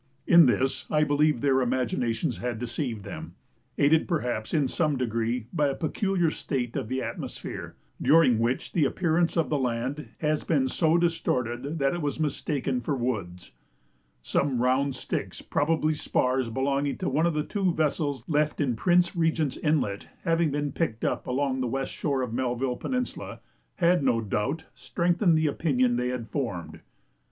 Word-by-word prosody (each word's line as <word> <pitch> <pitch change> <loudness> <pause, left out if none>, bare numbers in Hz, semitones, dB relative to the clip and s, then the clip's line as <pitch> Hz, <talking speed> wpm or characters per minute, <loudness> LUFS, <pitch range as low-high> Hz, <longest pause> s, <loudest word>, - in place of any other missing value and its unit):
In 170 -4 +7
this 130 +1 0
I 150 0 +3
believe 145 -3 +2
their 135 -2 +3
imaginations 120 -2 -1
had 120 -1 -3
deceived 120 -2 -4
them, - - -8 0.4
aided 155 +3 +4
perhaps 125 - -2
in 150 -4 +2
some 150 +1 0
degree 115 -1 -1
by 150 -3 +2
a 135 - -1
peculiar 175 +1 0
state 125 -6 -3
of - - -2
the 130 0 -1
atmosphere, - - -6 0.3
during 150 -8 +5
which 120 +3 -1
the 165 - +3
appearance 170 +2 +1
of 165 - +1
the 150 - +2
land 130 +4 -2
has 155 -1 0
been 140 -5 +1
so 160 +5 +2
distorted 140 -5 -1
that 135 -2 +1
it 175 - -3
has 145 -2 -2
been 160 - 0
mistaken 135 -3 -1
for 145 - -1
woods. 100 -9 -3 0.7
Some 135 - 0
round 130 +2 +2
sticks, - - -4
probably 155 +1 +1
spars 130 -4 0
belonging 140 +3 0
to 185 - -3
one 155 +5 +2
of 170 - -1
the 150 - +1
two 195 +1 0
vessels 145 -5 -1
left 150 -1 +1
in 135 -6 +1
Prince 175 - +3
Regent's 160 -4 +1
Inlet, 145 -11 0 0.2
having 165 -1 +2
been 145 0 -2
picked 115 -10 -2
up - - -1
along 130 0 0
the 125 - 0
west 135 +3 -2
shore 140 -3 -1
of 120 -3 -4
Melville 125 0 -1
Peninsula, 250 -1 -3 0.4
had 175 -1 +3
no 125 -3 +3
doubt 115 +9 -2
strengthened 170 - +1
the 155 - +1
opinion 130 -5 +1
they 125 +1 0
had 125 -2 -3
formed. 100 - -4
140 Hz, 165 wpm, -27 LUFS, 125-160 Hz, 0.7 s, In